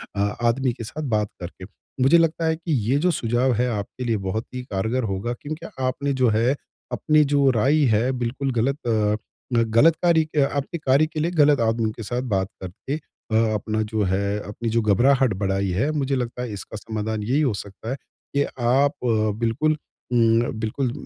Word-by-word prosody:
अ, - - -3 0.2
आदमी 120 +1 +2
के 115 - -8
साथ 155 +8 -6
बात 105 -1 +1
करके। 90 +1 -8 0.4
मुझे 135 +6 +6
लगता 165 0 +1
हैं 160 0 +1
कि 165 0 -5 0.2
ये 140 - +4
जो 180 +2 +2
सुझाव 120 0 +1
हैं 125 +2 +1
आपके 105 +2 -4
लिए 115 -2 +1
बहुत 100 +3 -3
ही 125 - -4
कारगर 110 +3 -1
होगा। 100 +3 -2
क्योंकि 155 +3 -6 0.2
आपने 140 +2 -1
जो 130 -2 +3
हैं 115 +5 +2 0.4
अपनी 155 -1 +3
जो 140 -1 +4
राय 135 +6 +3
हैं 125 +5 +1
बिल्कुल 130 +3 -2
गलत 130 +4 0
अ, 110 +2 -1
गलत 130 +9 +5
कार्य 170 -2 +4
के 155 -1 0
आपके 140 +4 -2
कार्य 140 0 +3
के 155 - -5
लिए 165 +3 0
गलत 150 -5 +4
आदमी 115 -1 +1
के 115 - -6
साथ 120 +4 -2
बात 95 0 0
करके 95 +10 -5 0.6
अपना 110 +1 -1
जो 110 -1 +1
हैं 100 +2 0
अपनी 105 +3 -4
जो 115 +1 +2
घबराहट 125 +3 +3
बढ़ाई 95 0 0
हैं। 100 +11 +1
मुझे 140 -3 0
लगता 125 -1 -3
हैं 125 - -4
इसका 105 +1 -7
समाधान 110 0 -3
यही 130 +7 +1
हो 135 -7 +2
सकता 100 +2 -7
हैं 135 - -2 0.4
कि 140 - +4 0.2
आप 135 +4 +3 0.5
बिल्कुल 135 +7 +1 0.4
म 115 0 +3
बिल्कुल 120 +3 -1
120 Hz, 190 wpm, -23 LUFS, 110-140 Hz, 0.6 s, मुझे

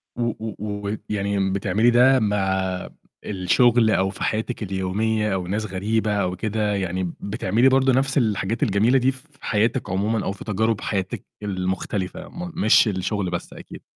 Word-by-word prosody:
و 120 - -4 0.2
و 110 -1 -5 0.3
و 105 - -2
يعني 100 -1 0
بتعملي 105 +4 +2
ده 130 +2 +5
مع 95 -3 -1 0.4
الشُغل 110 +4 +3
أو 95 -1 +2
في 95 - -6
حياتِك 110 +2 -2
اليومية 105 +3 -1
أو 90 -2 -2
ناس 105 +4 -2
غريبة 105 +3 -1
أو 90 -3 0
كده، 105 +1 -1
يعني 95 -2 -2
بتعملي 110 +4 +2
برضه 130 0 +3
نَفْس 135 +2 +1
الحاجات 110 -2 0
الجميلة 110 +6 +3
دي 130 +1 +3
في 130 +3 -15
حياتِك 115 +4 0
عمومًا، 105 +4 0
أو - - 0
في 100 - -9
تجارب 110 +1 0
حياتِك 95 -3 -3 0.2
المختلفة 95 - -3
م 175 -1 -7
مش 175 - +5
الشُغل 95 0 -1
بس - - -5
أكيد. - - -11
105 Hz, 160 wpm, -23 LUFS, 95-115 Hz, 0.4 s, ده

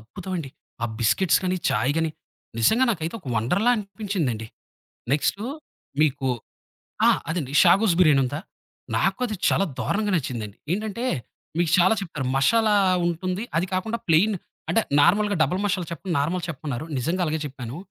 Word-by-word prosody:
అద్భుతమండి. 165 - -6 0.3
ఆ - - +2 0.2
బిస్కెట్స్ 120 - +3
గాని, 185 0 +1
చాయ్ 125 +7 +1
గాని, 160 -1 +1 0.5
నిజంగా 220 - +4
నాకైతే 170 -2 -3
ఒక 135 - -9
వండర్‌ల 180 - +1
అనిపించిందండి. 190 - -3 0.7
నెక్స్టు 195 +7 0 0.6
మీకు 140 -3 +1 0.8
ఆ! - - +7 0.2
అదండి. 150 -6 -3
'షాగోస్' 195 -3 +5
బిర్యాని 150 -6 +5
ఉందా? 145 +5 -3 0.6
నాకది 240 -5 0
చాలా 195 - +3
దారుణంగా 205 -1 0
నచ్చిందండి. 115 -8 -4 0.2
ఏంటంటే 215 +4 -3 0.5
మీకు 170 -2 +2
చాలా 185 +5 +5
చెప్పారు. 155 -9 -4
మషాలా 215 +9 +3 0.3
ఉంటుంది. 185 +4 -2
అది 175 +3 +2
కాకుండా 220 +5 -1
ప్లెయిన్ 190 +7 +4 0.4
అంటే 225 - +3 0.2
నార్మల్‌గా 200 +6 +3
డబల్ 180 +4 0
మషాలా 190 -4 0
చెప్ 170 - -8
నార్మల్‌ 165 +5 0
చెప్పమన్నారు. 145 -3 -4
నిజంగా 170 +8 -1
అలాగే 155 -1 -1
చెప్పాను. 130 -1 -7
175 Hz, 135 wpm, -24 LUFS, 140-200 Hz, 0.8 s, ఆ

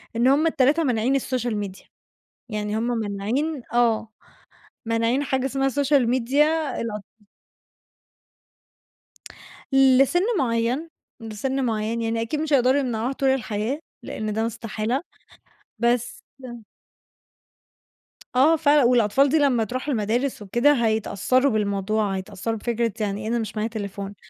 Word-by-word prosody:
إن 235 +2 +2
هم 285 +5 +4
ال3 305 +1 +2
مانعين 250 -1 +1
السوشيال 245 -4 -1
ميديا. 200 -2 -6 0.7
يعني 210 -1 -2
هم 230 +2 -1
مانعين 225 +9 -2
آه، 235 -2 +2 0.8
مانعين 230 +4 +1
حاجة 265 -2 -1
اسمها 270 0 0
سوشيال 275 -2 +2
ميديا 260 +4 +2 0.4
الاطف 210 -3 -4 2.7
لسِن 270 +5 +5 0.2
معيّن، 245 +5 0 0.3
لسِن 240 +5 -3
معيّن. 225 0 -1
يعني 225 0 -1
أكيد 230 +7 -2
مش 310 -1 -1
هيقدروا 260 +1 +4
يمنعوها 245 -2 -2
طول 270 0 0
الحياة، 240 0 -1 0.2
لإن 215 -1 -4
ده 220 +2 0
استحالة 225 +2 -3 0.8
بس 240 0 0 2.1
آه 290 +6 +5
فعلًا. 295 -2 +4
والأطفال 245 +3 +3
دي 315 - +3
لمّا 270 -6 +2
تروح 255 +6 -5
المدارس 245 +1 -1
وكده، 240 +8 +3
هيتأثّروا 220 +4 +1
بالموضوع، 205 -1 0
هيتأثّروا 195 +3 -4
بفكرة 235 0 -1
يعني 205 -1 -2
إيه 215 - -5
أنا 235 +1 0
مش 220 -1 -5
معايا 215 +1 -1
تليفون. 200 -2 -6
235 Hz, 120 wpm, -23 LUFS, 215-270 Hz, 2.7 s, لسِن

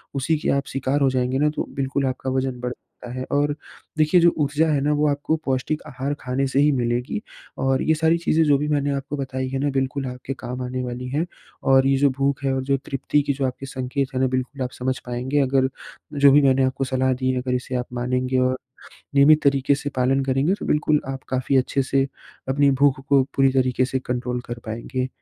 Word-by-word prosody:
उसी 145 +4 +1
के - - -2
आप 140 0 +1
शिकार 135 +2 0
हो 135 - +4
जाएँगे 130 0 0
न 150 +1 +3
तो - - -3
बिल्कुल 135 0 -1
आपका 130 0 -2
वज़न 130 -1 -1
बढ़ता 125 0 -8
है। 130 0 -4
और 145 +1 +1 0.4
देखिए 155 +3 +4
जो 170 - +7
ऊर्जा 150 +1 +1
है 145 - +2
न 145 - +1
वो 150 +1 +2
आपको 145 +2 0
पौष्टिक 135 +3 -1
आहार 135 +3 -3
खाने 130 +2 -1
से 135 +1 0
ही 150 +1 +5
मिलेगी 125 - -1 0.4
और 135 0 +1
ये 160 - +3
सारी 160 +1 +2
चीज़ें 165 -1 +2
जो 145 -2 +4
भी 150 +2 -2
मैंने 145 -1 +1
आपको 140 +1 -4
बताई 130 -1 -3
हैं 135 0 -2
ना 145 +1 +1
बिल्कुल 135 0 -1
आपके 125 +1 -5
काम 125 +1 -5
आने 125 +1 -3
वाली 125 0 -5
हैं 150 +6 0 0.5
और 135 0 +5
ये 135 - +3
जो 140 +1 +4
भूख 140 0 0
है 135 -1 +1
और 130 0 -1
जो 135 +1 +1
तृप्ति 145 +2 0
की 140 0 -1
जो 135 0 -1
आपके 130 +1 -4
संकेत 135 +1 -3
हैं 130 - +1
न 130 - +3
बिल्कुल 130 +2 -3
आप 125 - -4
समझ 130 +1 -1
पाएँगे। 125 +4 -1
अगर 130 -1 +2 0.4
जो 140 -1 +6
भी 145 +2 +6
मैंने 135 -1 +4
आपको 130 +1 0
सलाह 130 0 +1
दी 130 +1 0
है 130 -1 -1
अगर 125 0 -2
इसे 130 +1 -4
आप 125 0 -1
मानेंगे 125 +1 -1
और 130 0 +1 0.6
नियमित 150 +2 +6
तरीके 140 0 +3
से 145 0 -4
पालन 130 +2 +2
करेंगे 135 +7 +1
तो - - -4
बिल्कुल 150 0 +2
आप 135 -1 -5
काफ़ी 130 +1 0
अच्छे 135 +1 +1
से 135 +1 +1 0.4
अपनी 140 +1 +3
भूख 140 -2 +4
को 140 -1 +5
पूरी 135 -1 +4
तरीके 130 -1 +2
से 130 +1 -1
कंट्रोल 125 0 -2
कर 120 0 -5
पाएँगे। 125 +4 -3
135 Hz, 225 wpm, -23 LUFS, 130-140 Hz, 0.6 s, जो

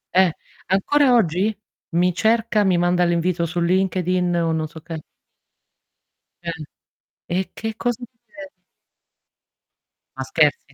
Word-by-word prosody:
Eh, 185 -2 +5 0.4
ancora 260 +9 +3
oggi 195 +1 +2 0.4
mi 180 +1 +3
cerca, 220 +2 +2
mi 185 -3 +3
manda 175 +1 +2
l'invito 170 0 +1
su 175 +2 -3
LinkedIn 180 0 +1
o 165 -1 +1
non 160 -1 -1
so 160 +1 -11
che. 165 -1 -7 1.4
Eh, 170 -1 -3 0.8
e 185 +2 -2
che 225 0 -5
cosa 240 0 -1
mi 235 -1 -48
de 290 +3 -11 1.7
Ma - - -2
scherzi? 470 - +1
180 Hz, 125 wpm, -22 LUFS, 170-220 Hz, 1.7 s, Eh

